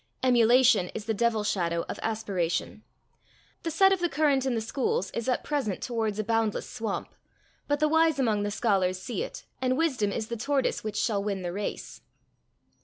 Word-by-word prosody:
Emulation 240 Hz, -5 st, +5 dB
is 215 Hz, -, -5 dB
the 225 Hz, -, 0 dB
devil 225 Hz, 0 st, +1 dB
shadow 170 Hz, -5 st, 0 dB
of -, -, -5 dB
aspiration. 195 Hz, -6 st, -2 dB, 0.8 s
The 330 Hz, -, -3 dB
set 385 Hz, +5 st, +5 dB
of 380 Hz, -, -1 dB
the 350 Hz, -1 st, 0 dB
current 275 Hz, -3 st, +2 dB
in 255 Hz, -, 0 dB
the -, -, 0 dB
schools 220 Hz, -4 st, -1 dB
is 235 Hz, +2 st, -3 dB
at 250 Hz, -, 0 dB
present 270 Hz, -10 st, -1 dB
towards 225 Hz, -4 st, -2 dB
a 215 Hz, -, 0 dB
boundless 225 Hz, -1 st, 0 dB
swamp, 220 Hz, -4 st, -4 dB, 0.5 s
but 290 Hz, 0 st, +1 dB
the 305 Hz, -, +3 dB
wise 320 Hz, 0 st, +3 dB
among 220 Hz, -6 st, +1 dB
the 205 Hz, -, -1 dB
scholars 195 Hz, -4 st, +1 dB
see 240 Hz, -, -4 dB
it, -, -, -6 dB, 0.2 s
and 255 Hz, 0 st, +1 dB
wisdom 260 Hz, -11 st, +1 dB
is 220 Hz, -, -2 dB
the 235 Hz, -, -3 dB
tortoise 275 Hz, +3 st, 0 dB
which 215 Hz, -1 st, -4 dB
shall 205 Hz, -4 st, 0 dB
win 200 Hz, -2 st, -2 dB
the 175 Hz, 0 st, -3 dB
race. 205 Hz, +1 st, -5 dB
225 Hz, 185 wpm, -28 LUFS, 205-265 Hz, 0.8 s, Emulation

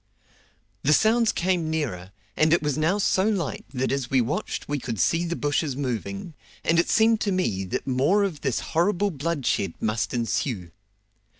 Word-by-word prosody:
The 150 Hz, -, +3 dB
sounds 225 Hz, +6 st, +4 dB
came 175 Hz, -3 st, 0 dB
nearer, 115 Hz, -, -3 dB, 0.2 s
and 155 Hz, +1 st, +3 dB
it 170 Hz, -, +2 dB
was 150 Hz, -2 st, 0 dB
now 160 Hz, +6 st, +1 dB
so 195 Hz, 0 st, +2 dB
light 180 Hz, -10 st, -2 dB
that 130 Hz, -1 st, -1 dB
as 135 Hz, -3 st, -2 dB
we 135 Hz, -, +3 dB
watched 145 Hz, -, -2 dB
we 145 Hz, 0 st, -1 dB
could 115 Hz, -5 st, -4 dB
see 165 Hz, -, +2 dB
the 170 Hz, 0 st, -2 dB
bushes 145 Hz, -2 st, -1 dB
moving, 120 Hz, -, -4 dB, 0.3 s
and 165 Hz, +1 st, +3 dB
it 170 Hz, -, +1 dB
seemed 225 Hz, 0 st, +4 dB
to 205 Hz, -, 0 dB
me 105 Hz, -, 0 dB
that 90 Hz, -, -3 dB
more 140 Hz, +11 st, +2 dB
of 180 Hz, -7 st, -3 dB
this 135 Hz, -4 st, -1 dB
horrible 195 Hz, +4 st, +2 dB
bloodshed 145 Hz, -, -1 dB
must 105 Hz, -2 st, -1 dB
ensue. 115 Hz, -, -2 dB
150 Hz, 175 wpm, -25 LUFS, 125-175 Hz, 0.3 s, sounds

